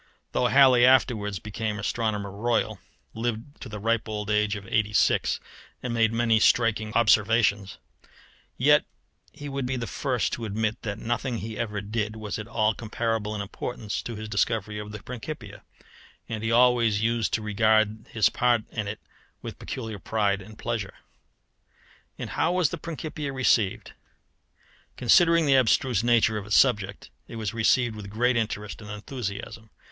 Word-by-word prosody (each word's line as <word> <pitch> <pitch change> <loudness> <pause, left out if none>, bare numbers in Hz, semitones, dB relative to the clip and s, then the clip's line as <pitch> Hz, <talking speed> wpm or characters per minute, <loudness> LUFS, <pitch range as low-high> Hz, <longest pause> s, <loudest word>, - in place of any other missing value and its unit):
Though 125 - +2
Halley 130 0 +6
afterwards 115 -5 +3
became 105 +2 -4
Astronomer 105 -1 -2
Royal, 110 0 -1 0.3
lived 115 +4 -4
to 130 - -7
the 105 - -6
ripe 115 +1 0
old 105 -1 -3
age 105 0 +2
of 100 -2 -8
eighty 105 0 0
six, - - +2 0.4
and 125 -2 -2
made 115 -1 +3
many 115 -1 +2
striking 110 -1 +2
observations, 105 -2 +3 0.8
yet 150 +4 +5 0.5
he 145 -1 -9
would 135 -2 -3
be 130 - -1
the 120 -2 -3
first 130 -1 -1
to 115 - -3
admit 110 +1 -2
that 105 -2 -4
nothing 120 +2 -2
he 110 0 -6
ever 105 -2 -3
did 105 +1 -3
was 110 -1 -5
at 110 - -6
all 110 -1 +1
comparable 110 -1 -2
in 105 - -3
importance 105 +1 -5
with 115 - -5
his 110 0 -6
discovery 105 0 -1
of 105 0 -7
the 105 -1 -8
Principia; 120 -4 -8 0.7
and 110 -1 -5
he 115 - 0
always 115 -3 +4
used 115 -1 +1
to 110 - -4
regard 110 +1 +2
his 110 -5 +3
part 120 -2 +2
in 105 -3 -3
it 105 +1 -5 0.4
with - - -7
peculiar 110 -5 -6
pride 100 -1 0
and 105 +3 -13
pleasure. 115 -5 -4 1.2
And - - -6
how 175 - +1
was 180 -5 +2
the 170 - -3
Principia 155 -3 -5
received? 120 -7 +1 1.0
Considering 165 +6 +5
the 135 -2 +5
abstruse 125 -2 +2
nature 115 -2 +3
of 100 - -10
its 105 - +1
subject, 105 -7 +1 0.2
it - - -9
was 110 -1 -3
received 115 0 +2
with 105 -2 -8
great 120 +4 +1
interest 105 -2 -3
and 105 - -10
enthusiasm. 110 -1 -6
110 Hz, 160 wpm, -26 LUFS, 105-120 Hz, 1.2 s, Halley